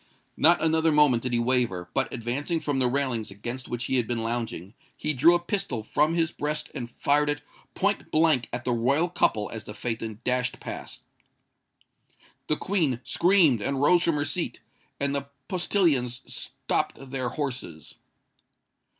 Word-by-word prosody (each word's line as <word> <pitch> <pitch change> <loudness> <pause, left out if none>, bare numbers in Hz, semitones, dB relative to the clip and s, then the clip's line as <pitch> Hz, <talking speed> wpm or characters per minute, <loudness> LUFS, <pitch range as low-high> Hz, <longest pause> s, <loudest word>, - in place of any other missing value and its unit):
Not 170 +1 +4
another 160 0 +3
moment 150 -6 +4
did 125 - -3
he 120 - +2
waver; 120 -7 +1
but, 135 - 0
advancing 130 +7 -2
from 145 -3 -1
the 130 - +3
railings 125 -4 -1
against 120 +6 -6
which 120 0 -3
he 130 +2 0
had 120 -3 +1
been 120 -2 -2
lounging, 115 -5 -3 0.2
he 155 - 0
drew 160 +6 +5
a - - +2
pistol 175 - -2
from 155 +8 +1
his 165 -2 +1
breast 150 +1 -3
and 120 -1 -5
fired 145 +4 +1
it 145 0 -2 0.3
point 200 +1 0
blank 155 -6 +3
at 120 0 -5
the 125 - +1
royal 135 +9 +2
couple 110 -11 +1
as 110 - -7
the 105 - -8
phaeton 110 -1 -4
dashed 125 0 0
past. - - -7 1.4
The 155 - +1
Queen 160 - 0
screamed 170 - +4
and 135 +5 -1
rose 170 +5 +5
from 170 -3 +2
her 145 -1 0
seat; 175 +1 -2 0.4
and 140 0 +1
the 140 0 -3 0.2
postillions 155 - +1
stopped 135 -1 -3
their 130 -2 -1
horses. 125 - -5
135 Hz, 165 wpm, -26 LUFS, 120-155 Hz, 1.4 s, drew